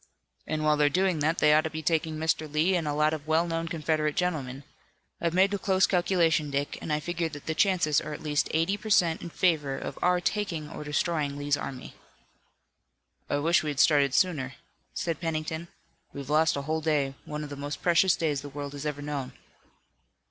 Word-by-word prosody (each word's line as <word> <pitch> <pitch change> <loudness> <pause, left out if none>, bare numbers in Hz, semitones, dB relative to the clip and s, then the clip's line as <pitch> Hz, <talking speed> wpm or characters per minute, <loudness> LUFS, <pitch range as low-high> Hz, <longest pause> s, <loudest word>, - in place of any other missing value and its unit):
"And 155 0 -2
while 150 0 +3
they're 145 0 +4
doing 185 -1 +1
that 155 +3 +1
we 150 0 +6
ought 155 - +5
to 160 - -2
be 155 0 -6
taking 160 0 0
Mr. 155 -1 -1
Lee 160 +5 +2
and 165 -3 -1
a 145 - 0
lot 150 +1 +2
of 155 -1 -6
well 160 +2 +3
known 165 -1 -2
Confederate 155 -2 -1
gentlemen. 140 -7 -2 0.6
I've 170 0 0
made 195 +2 +4
a 200 - -1
close 190 -2 +3
calculation, 175 -4 +2
Dick, 140 +1 -2
and 160 - -4
I 150 - +1
figure 170 +1 -2
that 145 -2 -10
the 160 - -1
chances 170 -5 +2
are 155 - -6
at 150 - -7
least 150 -2 +1
eighty 165 +6 +1
per 215 - -8
cent 170 -5 +3
in 170 - -6
favor 155 -6 +1
of - - -6
our 180 0 +3
taking 175 -4 -2
or - - -7
destroying 150 -1 -1
Lee's 145 0 +1
army." 130 -2 -7 1.4
"I 145 - +1
wish 165 +4 +3
we 155 - -3
had 145 -2 -3
started 140 -4 +4
sooner," 140 -8 +1 0.4
said 165 -2 -2
Pennington. 160 0 -3 0.5
"We've 140 0 -6
lost 155 +1 +3
a 140 - -3
whole 160 +2 -1
day, 150 -4 +1
one 150 0 -5
of 145 - -8
the - - -5
most 145 +1 -6
precious 180 +1 +4
days 150 -4 -1
the 145 - -8
world 145 0 -6
has 145 +1 -5
ever 145 -1 -4
known." 145 -3 -4
155 Hz, 210 wpm, -28 LUFS, 145-170 Hz, 1.4 s, we